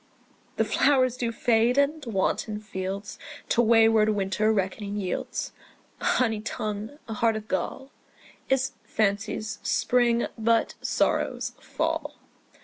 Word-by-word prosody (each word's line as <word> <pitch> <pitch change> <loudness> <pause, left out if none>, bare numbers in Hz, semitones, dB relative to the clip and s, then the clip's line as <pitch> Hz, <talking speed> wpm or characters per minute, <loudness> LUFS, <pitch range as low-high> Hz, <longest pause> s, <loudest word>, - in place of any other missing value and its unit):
The - - +1
flowers 255 -3 +3
do 240 -2 -2
fade; 235 +2 +2
and 290 +2 +2
wanton 210 0 -1
fields 200 -1 -5 0.3
To 240 - +4
wayward 225 -1 +5
winter 210 +1 +1
reckoning 200 0 -2
yields: 195 -3 -3 0.5
A - - -5
honey 225 -4 +2
tongue, 215 +4 -4
a 225 - -4
heart 225 +1 +2
of 215 0 -6
gall, 265 +9 -3 0.6
Is 265 0 +2
fancy's 215 +1 -1
spring, 240 -1 +2
but 230 +1 +2
sorrow's - - 0
fall. - - -2
220 Hz, 120 wpm, -26 LUFS, 210-240 Hz, 0.6 s, wayward